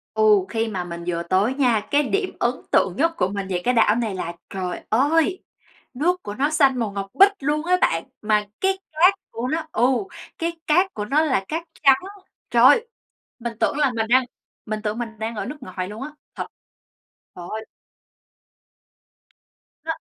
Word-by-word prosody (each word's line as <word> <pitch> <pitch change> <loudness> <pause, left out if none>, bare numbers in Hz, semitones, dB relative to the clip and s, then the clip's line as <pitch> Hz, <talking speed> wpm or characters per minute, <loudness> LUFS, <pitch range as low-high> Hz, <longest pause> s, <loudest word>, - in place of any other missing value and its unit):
Ừ, 215 -3 +5
khi 225 +1 -1
mà 185 -4 -3
mình 170 -1 -7
vừa 170 -1 -1
tới 190 +8 +1
nha, 240 -6 +1
cái 290 +1 +4
điểm 390 +6 -1
ấn 240 - +2 0.2
tượng 185 +1 +2
nhất 330 +3 +2
của 180 - +1
mình 200 -1 -4
về 180 -2 -1
cái 250 0 +2
đảo 220 -2 +5
này 225 -4 -1
là 170 -2 -4 0.2
trời 185 -2 -4
ơi, 320 - +2 0.5
nước 355 +7 0
của 205 - -6
nó 285 +5 +1
xanh 275 -5 +3
màu 225 -3 -1
ngọc 195 -1 -4
bích 395 +1 +7
luôn 295 +3 -1
á 365 0 +4
bạn, 165 0 +2 0.2
mà 210 -1 +2
cái 385 0 +1
cát 355 +5 +5 0.2
của 240 +3 -4
nó 320 +2 -2
ừ, 230 - -1 0.6
cái 335 0 -2
cát 360 +5 +3
của 210 - -3
nó 295 +8 +2
là 255 -10 +1
cát 325 +2 -2 0.2
trắng. 270 -2 +7 0.5
Trời - - +4
ơi! 475 -1 +6 0.5
Mình 235 0 -4
tưởng - - +1
là 280 -4 +3
mình 220 -1 0
đang 255 +1 +5 0.4
mình 215 -1 -3
tưởng 210 +1 -2
mình 235 -1 -3
đang 225 +1 -3
ở - - -3
nước 295 - -6
ngoài 185 -3 -5
luôn 215 +4 -8
á, 285 - -4 0.3
thật! - - -3 0.9
Trời 175 -1 -8
ơi! 220 0 -5 2.2
Nó - - -3
235 Hz, 190 wpm, -23 LUFS, 205-305 Hz, 2.2 s, bích